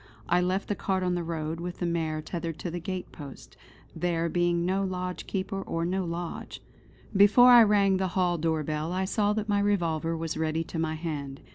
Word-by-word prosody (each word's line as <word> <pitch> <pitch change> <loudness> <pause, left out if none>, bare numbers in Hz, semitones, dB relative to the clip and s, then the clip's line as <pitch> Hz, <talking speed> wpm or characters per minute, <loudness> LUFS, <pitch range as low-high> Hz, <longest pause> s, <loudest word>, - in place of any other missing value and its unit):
I 175 +1 +3
left 185 +2 -1
the - - 0
cart 190 -2 -1
on 180 -1 +1
the 175 - -1
road, 160 -1 -3
with 175 +1 -5
the 175 - -2
mare 160 -2 -1
tethered 165 -2 -4
to 175 - -5
the 175 - -4
gate 185 +2 -5
post, 140 -3 -11 0.4
there 170 -1 0
being 175 0 +1
no 190 +2 +1
lodgekeeper 185 +1 -3
or 165 -3 -2
no 185 +1 -1
lodge. 170 0 -5 0.6
Before 210 +6 +7
I 240 -1 +10
rang 200 -3 +4
the 190 0 0
hall 175 -2 +2
door 160 -1 0
bell 155 +2 -3
I 190 +1 0
saw 205 +1 +1
that 215 0 -2
my 205 -1 +2
revolver 165 -5 0
was 165 -1 -3
ready 160 0 0
to 165 0 -6
my 160 -1 -1
hand. 145 -4 -5
175 Hz, 205 wpm, -28 LUFS, 165-190 Hz, 0.6 s, I